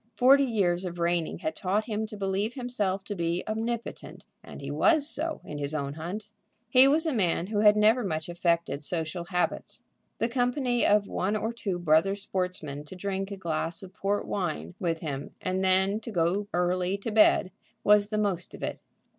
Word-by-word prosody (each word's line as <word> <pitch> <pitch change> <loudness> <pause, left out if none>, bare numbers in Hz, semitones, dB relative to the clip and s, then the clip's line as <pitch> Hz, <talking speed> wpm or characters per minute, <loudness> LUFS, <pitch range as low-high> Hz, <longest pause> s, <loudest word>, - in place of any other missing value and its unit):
Forty 270 +5 +6
years 190 -7 +1
of 175 -2 -5
reigning 170 -1 0
had 315 0 -3
taught 200 +2 0
him 220 -1 -3
to 215 -1 -9
believe 200 +4 -1
himself 210 -7 -2
to 205 - -5
be 170 -1 -1
omnipotent, 225 +2 -4 0.2
and - - -10
he - - -5
was 315 -4 +3
so 315 +1 -3
in 150 - -6
his 145 +1 -3
own 140 -2 -2
hunt. 190 +7 -6 0.4
He 255 +1 +8
was 310 +4 +3
a 315 - 0
man 180 -6 +1
who 205 +1 -2
had 210 0 +6
never 220 +4 +4
much 160 -5 -2
affected 170 -4 0
social 170 +2 -3
habits. 180 0 -2 0.3
The 230 - +1
company 245 0 +1
of 205 0 +4
one 200 +1 -1
or 225 +2 -2
two 200 -6 -3
brother 175 +3 +3
sportsmen 180 -7 -4
to 170 - -10
drink 195 +1 -3
a 200 - -6
glass 165 +1 -2
of 190 -1 -11
port 205 0 -1
wine 180 -3 -3
with 165 -4 -1
him 145 -3 -5
and 185 0 -1
then 190 +2 +3
to 225 - -8
go 185 +1 0
early 180 +2 0
to 210 +3 -5
bed, 210 -3 +4 0.3
was 205 0 +5
the 215 - -1
most 200 -4 -1
of - - -10
it. - - -3
195 Hz, 190 wpm, -28 LUFS, 175-220 Hz, 0.4 s, He